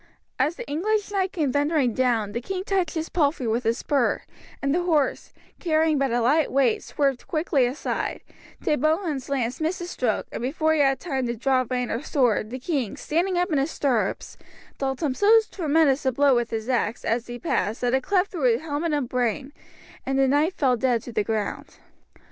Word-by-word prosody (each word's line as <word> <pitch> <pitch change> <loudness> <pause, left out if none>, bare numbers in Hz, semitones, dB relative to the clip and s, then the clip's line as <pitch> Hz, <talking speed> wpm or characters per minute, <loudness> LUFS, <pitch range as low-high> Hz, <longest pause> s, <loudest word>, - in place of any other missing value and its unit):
As 295 +6 +1
the - - -8
English 410 +8 -1
knight 385 -2 0
came 300 -7 0
thundering 285 -4 +1
down, 230 -4 +1
the 235 +3 -3
king 370 +7 -4
touched 380 -5 -1
his 320 0 -2
palfrey 290 -5 0
with 230 +2 -1
his 230 +1 +1
spur, 275 -5 0 0.4
and 275 0 0
the 350 - +1
horse, 315 -6 0 0.3
carrying 315 -3 +2
but 275 -1 +1
a 240 +1 +1
light 290 +6 +2
weight, 260 -5 +2
swerved 275 -3 -1
quickly 310 -5 +1
aside; 260 +5 -3 0.4
De - - +2
Bohun's 310 -2 0
lance 255 -1 -2
missed 325 +4 0
his 350 0 -6
stroke, 235 -4 -1
and - - -5
before 315 +5 +1
he 315 - +1
had 270 -2 +3
time 265 -7 -2
to 235 - -2
draw 255 +2 +1
rein 250 -1 -1
or 230 - -2
sword, 245 -8 +1
the 255 - -5
king, 265 - -2
standing 350 +4 0
up 355 +1 0
in 295 - +2
his 275 +3 0
stirrups, 240 -11 -1 0.4
dealt 270 +2 -2
him 285 -4 +1
so 415 +10 +5
tremendous 310 -5 +2
a 260 - +2
blow 280 +2 +3
with 240 -1 +1
his 225 0 -4
axe 240 -3 -1
as 230 +1 -1
he 240 0 -6
passed, 235 -6 -1
that 245 0 +1
it 265 - +3
cleft 380 +6 +1
through 255 -10 +2
helmet 310 +2 -2
and 285 -4 0
brain, 250 +3 -1 0.5
and 270 0 -1
the 270 0 +4
knight 295 +6 +2
fell 260 -7 +2
dead 240 -1 0
to 240 - -8
the 210 - 0
ground. 215 -1 -3
275 Hz, 205 wpm, -24 LUFS, 245-315 Hz, 0.5 s, so